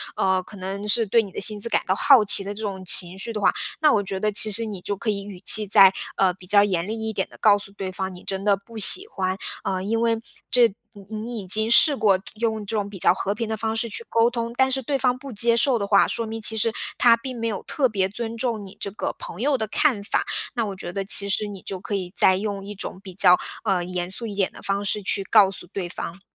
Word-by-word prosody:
呃， 190 -1 +1
可 200 +3 -13
能 195 +2 -6
是 225 +2 +2
对 230 +4 +3
你 200 - -10
的 - - -6
薪 210 +1 +2
资 230 - +3
感 - - +1
到 190 - +1
好 260 +1 +5
奇 200 - +4
的 200 +1 -5
这 210 - -9
种 195 -3 -5
情 180 +1 +5
绪 195 +4 -6
的 215 - -4
话， - - +3 0.3
那 305 -2 +4
我 205 - +1
觉 195 -1 -5
得 210 +2 0
其 215 +1 +4
实 230 +3 0
你 205 -4 -7
就 205 - -3
可 220 - -4
以 200 -1 -2
语 200 -2 -10
气 215 0 +6
再， 195 -1 +7 0.2
呃， 190 -2 +2
比 185 0 -16
较 205 +2 +5
严 180 -4 -1
厉 220 +1 -5
一 220 - -3
点 190 - -2
地 - - -16
告 205 -2 +5
诉 200 -1 -10
对 195 -2 -6
方， 190 0 -5
你 180 - -13
真 195 0 -4
的 205 -1 +3
不 225 +4 -14
喜 370 - +6
欢， 185 - -3 0.3
啊， 185 -1 -2
因 225 +4 -2
为 230 -1 +1 0.3
这 245 -1 +4 0.3
你 205 +1 -11
你 225 +2 -5
已 195 - -9
经 220 +4 +2
试 290 +4 +6
过 205 -6 +2 0.2
用 220 0 -2
这 220 +2 -5
种 205 -1 -2
比 200 -2 -10
较 - - +4
和 195 +2 -3
平 225 +1 -4
的 220 - -3
方 220 +1 -3
式 230 - 0
去 230 +1 -6
沟 230 +1 +3
通， 235 -1 -4
但 265 0 +3
是 265 0 0
对 275 +3 -2
方 250 -2 0
不 275 +1 -10
接 235 +1 +2
受 240 0 +2
的 200 - -3
话， 200 -1 +4
说 230 - -3
明 225 0 -7
其 220 +1 +2
实 220 +1 +1 0.2
他 235 -2 +5
并 245 +1 -8
没 230 - -2
有 210 -4 -4
特 275 -3 0
别 195 -5 -1
尊 225 +2 -6
重 225 -3 -3
你 190 - -13
这 200 - -4
个 210 - -5
朋 - - -9
友 280 +1 +1
的 220 -2 -3
看 220 -1 0
法。 205 - -1 0.3
那 235 -4 -1
我 200 -2 -6
觉 175 -2 -7
得 195 +2 -4
其 200 +1 +5
实 210 +2 0
你 200 -2 -9
就 190 +1 -6
可 200 +2 -5
以 185 -2 -4
再 185 - +4
用 200 0 -4
一 205 +1 -8
种 185 - -6
比 190 -2 -10
较， 180 -1 +5 0.3
呃， 190 -5 0
严 180 0 -4
肃 230 +5 -2
一 205 - -7
点 195 -2 0
的 - - -14
方 200 +1 -2
式 205 +1 -2
去 195 0 0
告 195 0 +4
诉 195 - -8
对 190 -3 -4
方。 175 +1 -7
205 Hz, 300 characters per minute, -23 LUFS, 195-230 Hz, 0.3 s, 再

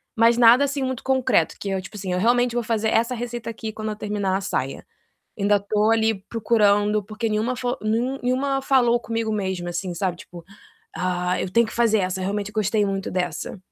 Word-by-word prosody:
mas 230 +1 +4
nada 240 +3 +7
assim 280 0 -2
muito 260 -2 -3
concreto, 260 -11 +2
que 200 - -4
eu, 190 -1 -1
tipo 185 +3 -12
assim, 190 -2 -4
eu 180 - 0
realmente 240 +3 +2
vou 240 - 0
fazer 220 -1 0
essa 235 +3 +1
receita 240 -1 -5
aqui 220 -1 -5
quando 215 0 -4
eu - - -4
terminar 205 -3 -1
a - - -5
saia. 135 -8 -3 0.5
Ainda 205 +1 +3
tô 210 +2 +1
ali 225 0 +2
procurando, 210 -2 +2
porque 220 +2 -3
nenhuma 220 +4 0
fo 245 +1 -2
nen 235 +5 -1
nenhuma 270 +2 0
falou 245 -3 +3
comigo 230 -1 -3
mesmo 190 -4 -2
assim, 175 +1 -3
sabe. 175 0 -2
Tipo: 175 -1 -12 0.5
"Ah, 180 0 -1
eu - - -3
tenho 235 +4 +4
que - - -8
fazer 230 -2 +3
essa, 185 0 -1
realmente 200 +2 -2
eu - - -15
gostei 210 0 +1
muito 195 -1 -3
dessa." 180 +1 -3
215 Hz, 205 wpm, -23 LUFS, 195-235 Hz, 0.5 s, nada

